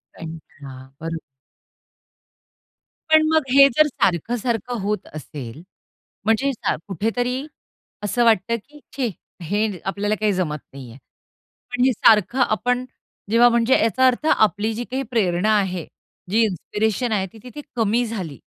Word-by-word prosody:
कंटाळा, 155 -4 -10 0.2
बरोबर. 165 0 -4 1.9
पण 315 0 +7
मग 315 -2 +4
हे 275 0 +9
जर 305 0 +6
सारखं-सारखं 230 - -1
होत 210 +2 -2
असेल. 145 -2 -8 0.6
म्हणजे 225 +6 +2
सा 235 - -1
कुठेतरी 245 - -2 0.6
असं 240 +4 +1
वाटतं, 225 0 +3
की 295 0 -15 0.2
छे! 255 -4 0 0.3
हे 205 +2 -1
आपल्याला 205 +2 -1
काही 215 -1 +1
जमत 160 -5 -2
नाहीये. 125 -3 -10 0.7
पण 245 0 0
हे 265 - +4
सारखं 220 +4 +4
आपण, 250 +2 +1 0.5
जेव्हा 240 +1 +6
म्हणजे 235 +2 +3
याचा 245 +4 +3
अर्थ 255 +4 0
आपली 215 +1 +2
जी 235 - -4
काही 265 +1 -1
प्रेरणा 200 -2 +1
आहे. 185 -4 -2 0.5
जी 225 - +3
इन्स्पिरेशन 220 +4 -1
आहे 195 -3 0
ती 225 - -13
तिथे 275 +4 -9
कमी 230 +1 +1
झाली. 185 - -6
220 Hz, 135 wpm, -22 LUFS, 185-245 Hz, 1.9 s, हे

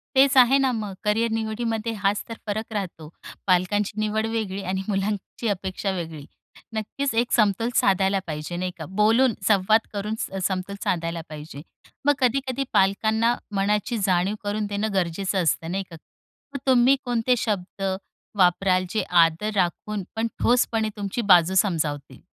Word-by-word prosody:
तेच 270 +1 +5
आहे 255 +2 +7
ना 265 -1 +2
मग 210 -3 -4
करियर 225 +2 +1
निवडीमध्ये 225 0 -2
हाच 200 0 0
तर - - -4
फरक 215 +2 -3
राहतो. 175 -6 -5 0.4
पालकांची 200 +3 +1
निवड 215 +1 0
वेगळी 215 -4 -3
आणि 190 +1 -2
मुलांची 205 +3 -2
अपेक्षा 190 0 -2
वेगळी. 165 -5 -6 0.5
नक्कीच, 225 +5 -2
एक 235 +1 +1
समतोल 215 0 +2
साधायला 195 0 +3
पाहिजे, 155 +2 -5
नाही 180 +1 -2
का? 160 - -6
बोलून, 220 +6 +3
संवाद 215 +2 +4
करून 210 +2 -3
स - - -3 0.2
समतोल 190 +1 -4
साधायला 165 -1 -1
पाहिजे. 150 -1 -9 0.4
मग 290 - +5
कधी-कधी 265 +1 0
पालकांना 220 +4 +2 0.2
मनाची 210 +4 0
जाणीव 185 +3 +1
करून 205 +1 -1
देणं 205 +1 -2
गरजेचं 190 +1 0
असतं, 165 +1 0
नाही 195 +2 -1
का? - - -8 0.6
मग 280 - -4
तुम्ही 260 +1 +5
कोणते 245 0 +1
शब्द 200 -3 -3 0.5
वापराल, 185 0 +3
जे 215 - -1 0.2
आदर 165 +7 -1
राखून 195 +2 -1
पण 225 +1 0
ठोसपणे 230 -2 +2
तुमची 200 +3 -3
बाजू 175 0 +6
समजावतील? 160 -7 0
205 Hz, 150 wpm, -24 LUFS, 185-225 Hz, 0.6 s, आहे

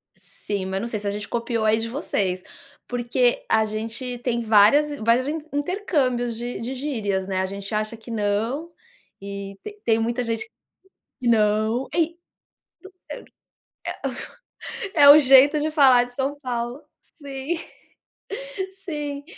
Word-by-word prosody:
sim, 200 -2 -5
mas 190 0 -2
não 235 - -3
sei 225 -3 -3
se 205 - -5
a - - +2
gente 205 0 -4
copiou 235 -1 -1
aí 215 0 +4
de 225 - -3
vocês, 195 - -1 0.5
porque 245 0 +1
a 220 0 +4
gente 225 +4 -4
tem 235 -1 -1
várias 230 +8 +5
vários 235 +4 +2
inter 310 +1 -4
intercâmbios 285 - 0
de 240 +1 -4
de 245 +3 -4
gírias, 220 -9 -2
né, 190 -1 -1
a - - 0
gente 200 +2 -6
acha 215 +2 -2
que 225 - -14
não, 225 +9 -1 0.5
e 200 0 -7 0.3
tem 225 -1 +3
muita 235 +2 -1
gente, 230 - -3 0.7
que 245 - 0
não, 220 +2 +2
e, 335 0 0 2.8
é, 330 - +2
é 285 - +10
o 295 +2 +11
jeito 275 +2 +6
de 305 +1 0
falar 265 -5 +6
de 245 0 -15
São 280 +2 -2
Paulo, 245 0 -4 0.4
sim, 275 +3 -4 1.3
sim. 295 -4 -4
240 Hz, 140 wpm, -23 LUFS, 215-280 Hz, 2.8 s, o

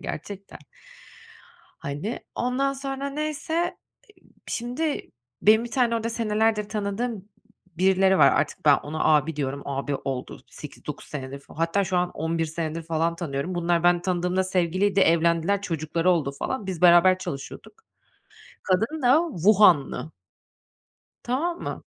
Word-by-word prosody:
gerçekten 200 -1 -7 1.2
hani. 145 +12 -4
Ondan 260 +3 0
sonra 275 0 -4
neyse, 305 +1 -3 0.7
ııı, - - -26
şimdi 260 +6 -3 0.3
benim 220 +2 +5
bir 240 - -7
tane 240 -3 +2
orada 230 0 -2
senelerdir 215 -2 0
tanıdığım 210 0 -3 0.5
birileri 190 +1 +4
var. - - +7
Artık 145 - -1
ben, 145 -2 +7
ona 155 +2 -4
abi 155 +1 +3
diyorum, 140 -1 -3
abi 140 0 -2
oldu 130 -2 -5
8-9 - - -9
senedir 140 -1 -6
fal 140 - -17
Hatta 165 +5 +1
şu 185 -1 -1
an 180 0 0
11 165 +1 -2
senedir 160 +1 -4
falan 165 +1 -1
tanıyorum. 165 +1 -4
Bunlar 170 -1 +1
ben 175 0 +4
tanıdığımda 180 0 0
sevgiliydi, 185 +2 +1
evlendiler, 170 +3 +3
çocukları 165 -1 -1
oldu 150 -6 0
falan. 215 - -4
Biz, 180 -3 -4
beraber 180 +1 +6
çalışıyorduk. 140 - -7 0.9
Kadın 225 +11 0
da 295 +8 +4
Wuhan'lı. 175 -6 +4 1.1
Tamam 325 +8 -2
mı? - - -5
185 Hz, 130 wpm, -25 LUFS, 160-225 Hz, 1.2 s, var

